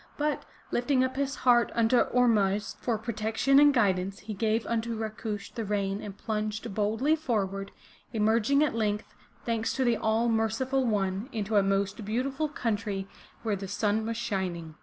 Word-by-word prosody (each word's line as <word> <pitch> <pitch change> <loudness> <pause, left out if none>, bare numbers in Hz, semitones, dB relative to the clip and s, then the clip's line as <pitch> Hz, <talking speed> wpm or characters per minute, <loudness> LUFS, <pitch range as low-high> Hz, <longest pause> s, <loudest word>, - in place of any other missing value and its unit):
But, 300 0 -1 0.3
lifting 255 +1 +2
up 260 0 -1
his 275 0 -1
heart 240 -1 +5
unto 230 +1 +3
Ormuzd 210 -5 +2
for 235 -3 0
pro 230 +2 -4
tection 225 +6 +3
and 290 0 +7
guidance, 195 -6 +1
he 215 +2 -6
gave 220 +2 0
unto 230 0 -1
Rakush 215 -1 -5
the 230 - -3
rein 200 -1 -1
and 200 -1 -8
plunged 215 0 -3
boldly 220 +9 +2
forward, 200 -9 -2 0.4
emerging 230 +5 +3
at 300 - +1
length, 210 -2 -1 0.3
thanks 225 -1 0
to 265 - 0
the 235 -2 +3
All 220 +2 +1
merciful 235 +4 +1
One, 200 +1 -1
into 215 -2 -2
a 205 - +6
most 195 +2 0
beautiful 265 +8 -1
country 205 -7 -2 0.4
where 220 -3 0
the 195 0 -6
sun 210 +2 0
was 230 0 -2
shining. 185 -8 -3
220 Hz, 165 wpm, -28 LUFS, 205-240 Hz, 0.4 s, and